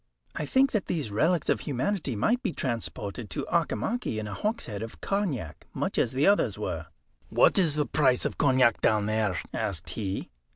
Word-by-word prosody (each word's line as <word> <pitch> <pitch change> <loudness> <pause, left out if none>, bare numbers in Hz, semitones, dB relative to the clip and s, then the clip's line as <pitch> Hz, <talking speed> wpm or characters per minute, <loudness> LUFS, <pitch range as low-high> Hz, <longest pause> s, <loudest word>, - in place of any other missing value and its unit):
"I 150 - -3
think 265 - +4
that 210 -5 -1
these 150 -11 -2
relics 160 - +2
of - - +2
humanity 145 - -1
might 235 - +2
be 215 -10 -2
transported 115 -3 -4
to - - -3
Auchimachie 170 - 0
in 110 - -3
a 105 - -5
hogshead 125 - -3
of 115 0 -7
cognac, 160 - -2
much - - -1
as 115 - +2
the 135 +3 +1
others 200 +1 +3
were." - - -4 0.4
"What - - +4
is 165 -6 +2
the 150 -1 +1
price 130 -5 +2
of - - -3
cognac 130 -4 +4
down 105 -1 +3
there?" 105 -4 0
asked 100 -7 -3
he. 100 -3 -4
130 Hz, 180 wpm, -28 LUFS, 110-180 Hz, 0.4 s, think